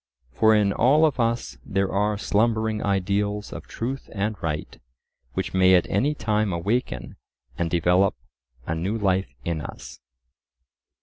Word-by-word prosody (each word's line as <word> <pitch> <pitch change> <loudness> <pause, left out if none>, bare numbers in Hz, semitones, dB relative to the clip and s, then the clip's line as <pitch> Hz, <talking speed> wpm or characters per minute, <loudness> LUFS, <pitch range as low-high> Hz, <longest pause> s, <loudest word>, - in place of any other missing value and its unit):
For 110 +8 +4
in 100 -2 +3
all 145 +7 +4
of 145 -4 0
us 115 - -1
there 95 +5 -1
are 105 +2 +1
slumbering 110 0 +1
ideals 100 +1 -1
of - - -8
truth 130 +4 -5
and 105 +2 -1
right, 75 -2 -4 0.5
which - - -3
may 95 0 +6
at 90 - +3
any 140 +10 +1
time 105 -5 0
awaken 85 - -2 0.4
and 85 -1 -1
develop 90 +3 +3 0.5
a - - -2
new 90 +7 -2
life 95 -2 0
in 85 -3 -1
us. - - -9
100 Hz, 140 wpm, -24 LUFS, 90-110 Hz, 0.5 s, may